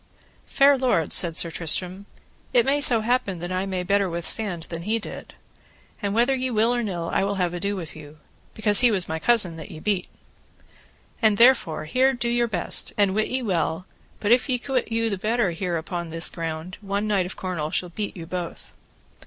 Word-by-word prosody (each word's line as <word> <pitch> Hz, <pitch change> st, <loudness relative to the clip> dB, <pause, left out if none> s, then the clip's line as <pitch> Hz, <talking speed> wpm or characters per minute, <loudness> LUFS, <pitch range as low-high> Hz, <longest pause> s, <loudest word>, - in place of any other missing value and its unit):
Fair 275 Hz, -1 st, +4 dB
lords, 245 Hz, -, +2 dB
said 170 Hz, -3 st, +3 dB
Sir 170 Hz, -, +2 dB
Tristram, 180 Hz, +4 st, +1 dB, 0.5 s
it -, -, +4 dB
may 285 Hz, +1 st, +1 dB
so 240 Hz, -5 st, +3 dB
happen 230 Hz, -5 st, 0 dB
that 175 Hz, +2 st, -6 dB
I 185 Hz, +1 st, -2 dB
may 185 Hz, -2 st, -2 dB
better 200 Hz, +1 st, +1 dB
withstand 170 Hz, +1 st, -1 dB
than 165 Hz, 0 st, -7 dB
he 215 Hz, +6 st, -1 dB
did, 225 Hz, -, -9 dB, 0.7 s
and 200 Hz, 0 st, -2 dB
whether 240 Hz, +4 st, +3 dB
ye 260 Hz, -1 st, -1 dB
will 230 Hz, +1 st, +2 dB
or 240 Hz, -, 0 dB
nill 175 Hz, -6 st, -4 dB
I -, -, +2 dB
will 200 Hz, +1 st, -1 dB
have 180 Hz, -2 st, -1 dB
ado 200 Hz, +3 st, -2 dB
with 170 Hz, -5 st, -7 dB
you, 150 Hz, -1 st, -12 dB, 0.4 s
because 210 Hz, -2 st, +6 dB
he 245 Hz, -, +6 dB
was 195 Hz, -5 st, 0 dB
my 160 Hz, 0 st, -3 dB
cousin 195 Hz, -6 st, +2 dB
that 160 Hz, -, -9 dB
ye 155 Hz, -, -9 dB
beat. 195 Hz, +1 st, -1 dB, 1.1 s
And 215 Hz, -3 st, +3 dB
therefore 235 Hz, -11 st, +4 dB
here 260 Hz, +10 st, +2 dB
do 240 Hz, -1 st, -2 dB
your 240 Hz, 0 st, +1 dB
best, 180 Hz, -6 st, 0 dB
and 200 Hz, -2 st, +3 dB
wit 215 Hz, +2 st, 0 dB
ye 260 Hz, 0 st, -2 dB
well 175 Hz, -3 st, -1 dB, 0.3 s
but 210 Hz, -, -1 dB
if 250 Hz, +3 st, +3 dB
ye 250 Hz, -, +2 dB
quit 255 Hz, -2 st, -2 dB
you 230 Hz, 0 st, 0 dB
the 200 Hz, -, -3 dB
better 220 Hz, -2 st, 0 dB
here 170 Hz, 0 st, -2 dB
upon 170 Hz, +1 st, -5 dB
this 165 Hz, +1 st, -1 dB
ground, 165 Hz, +2 st, -6 dB
one 200 Hz, +1 st, -2 dB
knight 200 Hz, -4 st, +1 dB
of 185 Hz, -, -9 dB
Cornwall 175 Hz, -5 st, -4 dB
shall 180 Hz, +2 st, -2 dB
beat 205 Hz, +3 st, -5 dB
you 165 Hz, -, -7 dB
both. 175 Hz, 0 st, -7 dB
195 Hz, 205 wpm, -24 LUFS, 170-230 Hz, 1.1 s, because